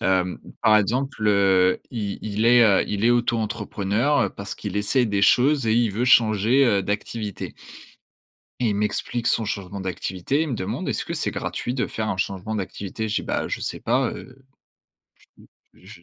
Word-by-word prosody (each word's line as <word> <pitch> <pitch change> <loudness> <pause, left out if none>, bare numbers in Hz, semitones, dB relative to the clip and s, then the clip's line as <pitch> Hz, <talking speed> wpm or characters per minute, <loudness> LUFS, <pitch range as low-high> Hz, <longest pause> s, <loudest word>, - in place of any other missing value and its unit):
Hem, 90 -1 +1 0.2
par 110 -1 +6
exemple, 115 +1 0
heu, 95 -2 +3
i 105 -4 -4
il 110 +1 -2
est, 120 0 +7
heu, 100 -4 +4
il 105 +1 -2
est 120 - +5
auto-entrepreneur, 115 +1 0
heu, - - +1
parce 100 0 -7
qu'il 105 -1 -6
essaie 120 +4 +2
des 100 -1 -1
choses 135 +4 +4
et 110 - +3
il 115 -4 +2
veut 120 +4 -1
changer, 115 +2 +4
heu, 100 -6 +2
d'activité. 105 +1 -4 1.1
Et 120 - +1
il 105 - 0
m'explique 115 +3 -2
son 115 - +2
changement 100 -2 -5
d'activité, 95 - -2
il 160 - -2
me 125 - -2
demande: 95 -3 -4
«Est-ce - - -2
que - - -5
c'est - - -2
gratuit 120 - -4
de 125 - -1
faire 110 -1 -3
un 100 - -1
changement 95 +3 -3
d'activité?» 100 +2 -4
je 105 - -1
dis: - - -1
«Bah, - - -2
je - - -3
sais - - -4
pas, - - +1
heu» 135 +1 -12 1.3
«je 85 - -15
105 Hz, 185 wpm, -23 LUFS, 100-120 Hz, 1.3 s, est